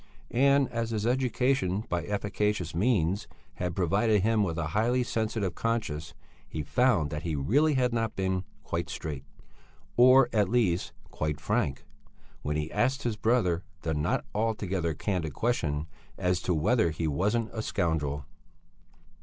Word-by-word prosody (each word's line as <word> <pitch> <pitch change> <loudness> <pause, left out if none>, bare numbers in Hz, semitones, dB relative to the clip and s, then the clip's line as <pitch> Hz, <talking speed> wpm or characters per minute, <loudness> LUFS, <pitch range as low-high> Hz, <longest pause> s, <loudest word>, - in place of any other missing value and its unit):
And 140 +2 +4
as 115 -1 -2
his 110 -2 -2
education, 125 -5 +1
by 90 -1 -1
efficacious 105 -3 -1
means, 95 -2 +1 0.3
had 90 -1 -2
provided 100 +3 +2
him 110 0 +3
with 85 -5 -1
a 80 -2 -2
highly 120 +8 +2
sensitive 110 -5 -1
conscience, 110 -10 -2 0.3
he 75 - -4
found 90 - +2
that 75 0 -3
he 85 -3 -2
really 140 - +2
had 125 -2 +2
not 115 -1 -1
been 95 -1 0 0.2
quite - - -3
straight, 75 -4 -5 0.7
or 130 +1 +7
at 105 -4 +2
least 100 -7 +1 0.2
quite 75 -1 -2
frank, 70 0 -1 0.6
when 75 +1 -2
he 75 +1 -2
asked 130 +3 +1
his 120 -3 -1
brother 105 -7 +2 0.2
the 80 - -1
not 75 0 0
altogether 100 -7 -1
candid 80 -4 -2
question 80 -11 0 0.3
as 90 0 0
to 90 - 0
whether 85 +4 +3
he 80 +1 -2
wasn't 105 +10 0
a 110 - -2
scoundrel. 75 -8 -1
100 Hz, 145 wpm, -29 LUFS, 80-115 Hz, 0.7 s, or